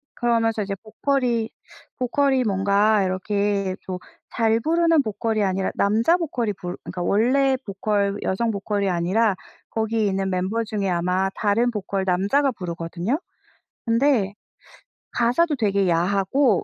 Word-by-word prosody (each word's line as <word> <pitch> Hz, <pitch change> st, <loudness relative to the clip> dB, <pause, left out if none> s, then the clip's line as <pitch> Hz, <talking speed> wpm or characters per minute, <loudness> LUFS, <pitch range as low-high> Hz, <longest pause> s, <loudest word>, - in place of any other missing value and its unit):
그러면서 225 Hz, -2 st, +1 dB
이제 200 Hz, -1 st, -3 dB
보컬이 230 Hz, +2 st, -1 dB, 0.5 s
보컬이 265 Hz, +1 st, +1 dB
뭔가 200 Hz, 0 st, +2 dB
이렇게 195 Hz, +1 st, -1 dB
좀 185 Hz, -1 st, -5 dB, 0.4 s
잘 225 Hz, -1 st, +2 dB
부르는 330 Hz, +1 st, +3 dB
보컬이 220 Hz, -1 st, -1 dB
아니라 190 Hz, 0 st, 0 dB
남자 225 Hz, +11 st, +3 dB
보컬이 255 Hz, -, -2 dB
불 180 Hz, -1 st, -7 dB
그러니까 180 Hz, -1 st, -5 dB
원래 260 Hz, +8 st, +2 dB
보컬 200 Hz, 0 st, -1 dB
여성 230 Hz, +5 st, 0 dB
보컬이 200 Hz, -1 st, -1 dB
아니라 190 Hz, +5 st, +1 dB, 0.4 s
거기에 220 Hz, 0 st, 0 dB
있는 195 Hz, -1 st, 0 dB
멤버 190 Hz, +5 st, -1 dB
중에 210 Hz, -3 st, -2 dB
아마 180 Hz, +2 st, +1 dB
다른 225 Hz, +3 st, +2 dB
보컬 200 Hz, -3 st, -3 dB
남자가 200 Hz, +10 st, +2 dB
부르거든요. 175 Hz, -, -3 dB, 0.7 s
근데 230 Hz, -4 st, +2 dB, 0.8 s
가사도 290 Hz, +7 st, +2 dB
되게 200 Hz, -4 st, +1 dB
야하고 195 Hz, +6 st, +2 dB
210 Hz, 300 characters per minute, -23 LUFS, 190-235 Hz, 0.8 s, 부르는